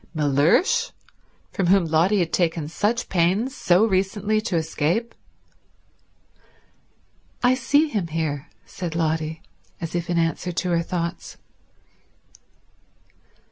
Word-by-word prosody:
Mellersh, 150 - +2 0.6
from 190 -4 -1
whom 190 -1 +4
Lotty 165 +6 +2
had 170 -3 -1
taken 165 -3 0
such 215 +9 -1
pains 190 +9 +1
so 180 -1 +3
recently 205 +1 0
to 215 -5 -3
escape? 165 +8 -1 2.3
"I 245 +1 +5
see 285 +5 +2
him 205 - -2
here," 155 -3 -3 0.2
said 170 -3 -6
Lotty, 160 -1 -1 0.4
as 165 0 -5
if 175 -1 -3
in 175 - 0
answer 165 +2 0
to 180 +1 -2
her 170 -1 +2
thoughts. 170 0 -4
175 Hz, 110 wpm, -23 LUFS, 160-205 Hz, 2.3 s, I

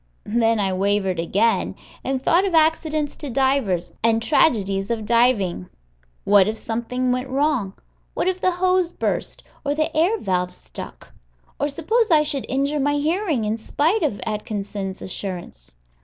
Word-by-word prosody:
Then 225 0 +2
I 195 -2 0
wavered 195 -1 0
again, 195 +3 +1 0.3
and 265 0 -1
thought 335 +7 +3
of 380 -4 0
accidents 310 -2 +2
to 290 - -5
divers, 255 -9 0
and 225 0 +3
tragedies 205 -6 +2
of 225 -2 -2
diving. 225 - +2 0.5
What 200 -1 +5
if 220 +1 -2
something 245 +3 -2
went 255 +1 -2
wrong! 265 -7 0 0.4
What - - 0
if 370 0 -1
the 370 - +3
hose 365 -1 +1
burst - - -3 0.2
or 285 0 -1
the 310 +1 -1
air 350 +8 +3
valve 180 - -1
stuck! - - -10 0.5
Or 290 - 0
suppose 440 +11 +1
I 310 -3 +5
should 285 -3 -3
injure 280 +3 0
my 290 +1 +1
hearing, 310 - 0
in 215 +1 -1
spite 315 - 0
of 280 -10 -1
Atkinson's 205 -3 -4
assurance? 175 - -6
245 Hz, 155 wpm, -22 LUFS, 200-300 Hz, 0.5 s, What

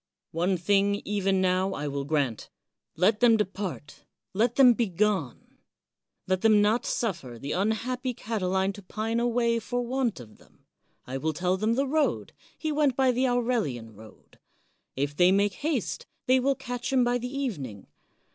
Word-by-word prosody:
One 180 +3 0
thing, 200 +3 +2
even 195 -2 +1
now, 185 +1 +1
I 145 - -4
will 140 -1 -3
grant 140 -7 -1 0.2
— - - -59
let 200 +6 +3
them 235 -2 +5
.depart, 195 -7 -4 0.3
let 225 +4 +1
them 255 -3 +7
begone. 200 - -1 0.7
Let 185 0 0
them 215 -2 +5
not 210 +3 +2
suffer 170 - -3
the 140 +5 -6
unhappy 245 +6 -1
Catiline 190 -3 -1
to 205 - -11
pine 220 +4 -2
away 235 -1 +1
for 245 +2 -3
want 245 - -1
of 110 -3 -13
them. - - -25 0.4
I 130 +1 -4
will 155 +2 -1
tell 180 +3 0
them 215 +4 0
the 275 +2 +1
road. 300 +2 0 0.2
He 315 - -2
went 290 -4 +2
by 265 -1 +3
the 255 +2 +1
Aurelian 225 - -1
road. 110 +1 -17 0.6
If 140 +2 -2
they 180 +3 +5
make 200 +1 +2
haste, 290 - -3 0.2
they 260 +1 +4
will 275 +2 +1
catch 245 0 -5
him 260 -2 +4
by 245 0 +1
the 250 +1 -5
evening. 140 - -4
210 Hz, 165 wpm, -27 LUFS, 180-245 Hz, 0.7 s, them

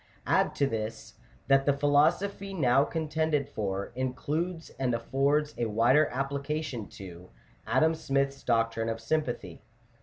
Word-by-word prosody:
Add - - +2
to 140 - +2
this, 110 -2 -5 0.3
that 135 +1 +4
the 140 -1 +3
philosophy 175 +8 +2
now 135 -4 +4
con 160 +1 -3
tended 155 -2 0
for, 100 -2 -3
includes, 150 +7 -3
and 125 -3 +1
affords 140 +5 +1
a 120 - +1
wider 120 +8 +4
application 140 -2 -3
to, 90 -2 -10 0.4
Adam 160 +1 +3
Smith's 140 -3 -1
doctrine 115 -1 0
of 115 0 -3
sympathy 120 - -2
(p. - - -28
135 Hz, 140 wpm, -29 LUFS, 115-150 Hz, 0.4 s, that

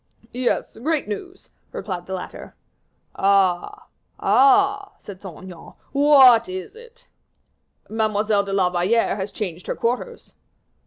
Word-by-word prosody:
"Yes; 245 -2 -2
great 305 +2 -1
news," 360 - -8 0.2
replied 180 -4 -6
the 190 - -4
latter. 180 - -9 0.6
"Ah! 195 -3 +1 0.3
ah!" 400 +9 +3
said 195 -3 -12
Saint 185 -3 -10
Aignan, 180 -3 -12 0.2
"what 270 -6 +6
is 185 - -7
it?" 480 +1 -16 0.8
"Mademoiselle 215 -1 0
de 200 - -6
la 190 -2 +1
Valliere 195 +6 +1
has 195 0 -4
changed 180 -4 -6
her - - -2
quarters." 250 - -4
215 Hz, 120 wpm, -22 LUFS, 190-275 Hz, 0.8 s, what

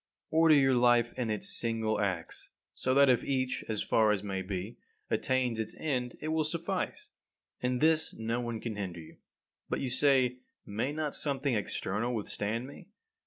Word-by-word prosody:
32. - - -5
Order 160 -1 +7
your 135 -2 +4
life 120 -1 +4
in 125 -3 -2
its 105 -1 +1
single 115 -2 +3
acts, 100 -3 -3 0.2
so 130 0 0
that 140 0 +6
if 125 -2 +3
each, 130 -2 -1
as 110 -1 -1
far 110 -1 +3
as 105 -1 -1
may 95 -2 -3
be, 95 +3 -5 0.3
attains 125 -3 0
its 110 - -4
end, 125 -5 -2
it 155 - -4
will 160 0 +1
suffice. 165 +2 -3 0.5
In 125 0 0
this 160 +3 +2
no 115 +2 -2
one 120 -2 -4
can 110 -3 -5
hinder 90 -4 -4
you. 80 - -13 0.5
But, - - -1
you 130 -2 -2
say, 130 -2 +3 0.3
may 110 +7 -2
not 150 -1 -3
something 140 -2 -1
external 105 +2 -2
withstand 110 +2 -3
me? 145 +7 -12
125 Hz, 175 wpm, -30 LUFS, 110-135 Hz, 0.5 s, Order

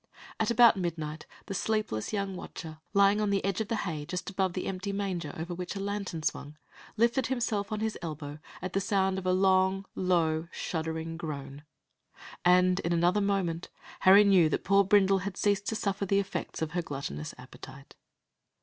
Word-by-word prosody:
At - - +1
about 235 -2 +6
midnight, 160 -4 -4 0.2
the 200 - -5
sleepless 210 - -1
young 200 -2 -2
watcher, 160 -3 -8
lying 200 +1 +4
on 210 - +1
the 200 -1 0
edge 195 +2 0
of 220 - -3
the 230 - -1
hay 160 -8 -3
just 180 +5 -5
above 190 -2 0
the 185 - -3
empty 190 +1 -3
manger 190 -6 -3
over 170 +2 -4
which 180 +2 -5
a - - -4
lantern 200 -5 -3
swung, 150 0 -3 0.4
lifted 235 +4 +2
himself 225 -5 -1
on 215 0 -2
his 220 0 -2
elbow 150 -3 -6 0.2
at 185 - -4
the 195 - +1
sound 190 -2 +1
of 185 - -5
a - - +3
long, 190 +1 +3
low, 165 -3 +1
shuddering 160 0 -4
groan, 145 -3 -6 0.8
and 180 +1 +4
in 175 -2 -1
another 175 +4 +3
moment, 190 -4 -1 0.3
Harry 195 +2 +8
knew 190 -6 +5
that - - -1
poor 200 +1 +4
Brindle 195 0 +4
had 195 0 -5
ceased 205 -1 +1
to 220 - -1
suffer 200 -2 -1
the 195 - +2
effects 195 -4 -3
of 160 - -3
her 175 - -1
gluttonous 135 - -5
appetite. - - -12
190 Hz, 185 wpm, -29 LUFS, 165-200 Hz, 0.8 s, Harry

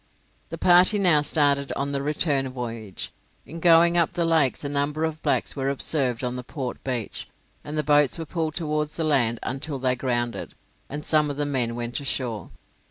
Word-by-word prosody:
The - - -6
party 180 +4 +5
now 175 -7 +4
started 145 -2 +1
on 140 +1 -2
the 140 -1 -2
return 140 -2 0
voyage. 115 -5 -5 0.3
In 165 +3 -9
going 170 0 +5
up 170 +2 +1
the 175 -1 0
lakes 160 -6 +2
a - - -2
number 145 +2 -1
of 160 -1 -2
blacks - - 0
were 135 -1 -1
observed 135 -3 0
on 125 0 -2
the 125 - -6
port 130 -1 -6
beach, 125 -5 -3 0.4
and 150 +1 -5
the 150 - +1
boats 145 0 +3
were 165 - -5
pulled 160 -1 -3
towards 150 -2 -2
the 165 - -1
land 130 -7 +2
until 140 +2 -4
they 130 -1 0
grounded, 120 -2 -3 0.3
and 150 +2 -6
some 155 -1 +3
of 145 - -5
the 145 - 0
men 125 -5 0
went 120 0 -3
ashore. 125 -5 -2
145 Hz, 190 wpm, -24 LUFS, 130-155 Hz, 0.4 s, party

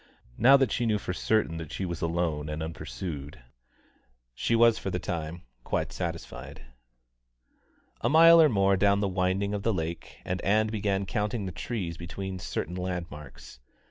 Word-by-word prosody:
Now 135 +4 +8
that 135 -6 +1
she 120 - 0
knew 110 -1 +2
for 90 - -4
certain 95 -4 0
that 80 -2 -7
she 95 - -3
was 85 -2 -5
alone 80 -3 -1
and 75 +1 -3
unpursued, 75 -1 -6 0.9
she 115 - 0
was 115 -1 +5
for - - -4
the 90 - -2
time 85 -2 -4 0.2
quite - - -2
satisfied. - - -6 1.4
A - - +1
mile 165 0 +8
more 100 -4 +3
down 100 +1 +3
the 100 - +1
windings 95 +2 0
of 100 - -2
the 115 - +1
lake, 85 -3 -4
and 90 -1 -2
Ann 105 +3 +3
began 100 -2 -1
counting 105 +1 -2
the 95 - -4
trees 85 -2 -4
between 95 +2 -6
certain 85 0 -4
landmarks. 85 -8 -6
95 Hz, 160 wpm, -28 LUFS, 85-105 Hz, 1.4 s, Now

